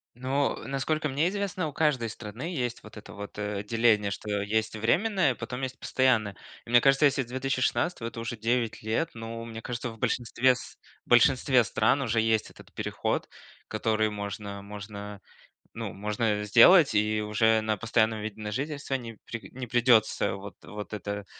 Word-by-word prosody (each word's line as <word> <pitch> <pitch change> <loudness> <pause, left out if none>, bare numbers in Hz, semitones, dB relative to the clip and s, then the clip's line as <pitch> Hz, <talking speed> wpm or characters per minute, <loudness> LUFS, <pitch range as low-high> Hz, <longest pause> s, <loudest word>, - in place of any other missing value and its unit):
Ну, 135 +3 0
насколько 150 +3 -1
мне 145 +6 +1
известно, 195 -4 -2
у 145 - -7
каждой 150 -7 +1
страны 110 +3 -8
есть 125 -5 -3
вот 110 0 -12
это 105 - -11
вот, 100 +1 -8
э, 105 -1 -3
деление, 105 -2 +2
что 105 0 -3
есть 110 +2 -1
временное, 170 - +2
потом 125 +3 -6
есть 130 0 -4
постоянное. 110 -7 +1 0.3
И - - -14
мне 120 0 +6
кажется, 135 +2 +5
если 135 -1 +3
с - - -12
2016 130 0 -1
это 115 - -9
уже 115 0 -4
9 115 0 -1
лет, 115 +10 0
ну, 115 0 -6
мне 115 -1 -7
кажется, 120 0 -4
в 115 - -10
большинстве 125 +3 +2
с - - -10 0.3
в - - -25
большинстве 125 +1 +5
стран 110 +5 +2
уже 115 -2 +1
есть 110 -1 +1
этот - - -16
переход, - - -2 0.4
который 110 -1 0
можно 100 -1 -5
можно, 105 0 -8 0.6
ну, - - -5
можно 105 +1 -1
сделать 125 - +7
и 105 +1 +2
уже 110 +1 +2
на 110 -1 -1
постоянном 110 -1 +1
виде 110 0 -6
на 105 0 -4
жительство 140 +2 -3
не 115 -3 -5
при 115 -1 -7
не 125 -1 -6
придется 115 -4 +3
вот 100 +1 -9
вот 105 0 -8
это 100 0 -4
115 Hz, 175 wpm, -28 LUFS, 105-130 Hz, 0.6 s, сделать